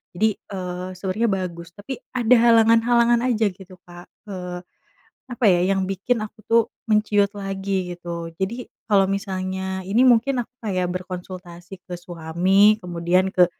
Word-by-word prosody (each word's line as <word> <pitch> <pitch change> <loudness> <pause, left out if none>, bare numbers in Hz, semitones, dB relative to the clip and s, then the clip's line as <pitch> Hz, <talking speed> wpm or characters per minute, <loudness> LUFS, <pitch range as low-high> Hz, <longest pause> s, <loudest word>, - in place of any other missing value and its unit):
jadi, 220 +5 +3 0.2
eee, 180 -1 -5
sebenarnya 195 +5 -1
bagus 170 -3 -4
tapi 225 +6 -7 0.2
ada 245 -1 +3
halangan-halangan 235 +1 +4
aja 225 -2 +2
gitu 185 0 -14
Kak, 175 0 -12 0.2
eee, 180 -2 -5 0.7
apa 245 0 -3
ya 175 -1 +3
yang 190 - 0
bikin 200 +5 -1
aku 215 - -12
tuh 230 0 +6 0.3
menciut 210 -1 +3
lagi 195 -2 -3
gitu 170 -1 -6
jadi 235 +6 -3 0.2
kalau 195 -2 +5
misalnya 190 -1 -3
ini 215 +6 +3
mungkin 245 +1 +3
aku - - -34
kayak 185 -4 -1
berkonsultasi 180 0 -8
ke 180 - -5
suami 180 +5 +2
kemudian 180 +2 +1
ke 180 -3 +5
190 Hz, 140 wpm, -22 LUFS, 180-220 Hz, 0.7 s, tuh